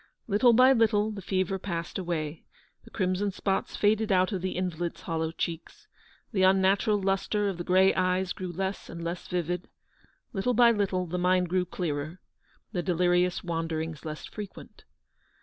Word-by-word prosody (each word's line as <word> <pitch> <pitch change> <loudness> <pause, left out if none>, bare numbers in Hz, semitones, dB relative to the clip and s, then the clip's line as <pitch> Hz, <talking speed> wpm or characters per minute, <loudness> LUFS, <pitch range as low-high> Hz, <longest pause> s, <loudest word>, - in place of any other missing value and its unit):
Little 230 +3 +4
by 255 +3 +7
little 220 -3 +2
the 205 -2 -7
fever 190 0 -1
passed 170 -2 -4
away; 160 -4 -3 0.4
the - - -13
crimson 190 0 0
spots 195 0 -2
faded 215 +1 +2
out 185 +1 +3
of 190 -4 -2
the 185 0 -3
invalid's 175 -2 -3
hollow 160 -1 -2
cheeks; 170 - -5 0.4
the 200 -5 0
unnatural 190 +2 +4
lustre 195 +2 0
of 190 -3 -3
the - - -2
grey 190 +2 +4
eyes 185 0 0
grew 185 -2 -5
less 190 +3 -4
and 170 0 -7
less 170 +1 -4
vivid; 180 0 -2 0.7
little 235 +4 0
by 235 0 +7
little 195 -4 0
the 180 +1 -3
mind 180 0 +2
grew 180 0 +1
clearer, 160 -1 -4 0.5
the 180 -5 -1
delirious 180 0 +1
wanderings 165 -2 -3
less 155 -1 -6
fre 210 - -7
quent. 200 - -11
185 Hz, 165 wpm, -28 LUFS, 175-200 Hz, 0.7 s, by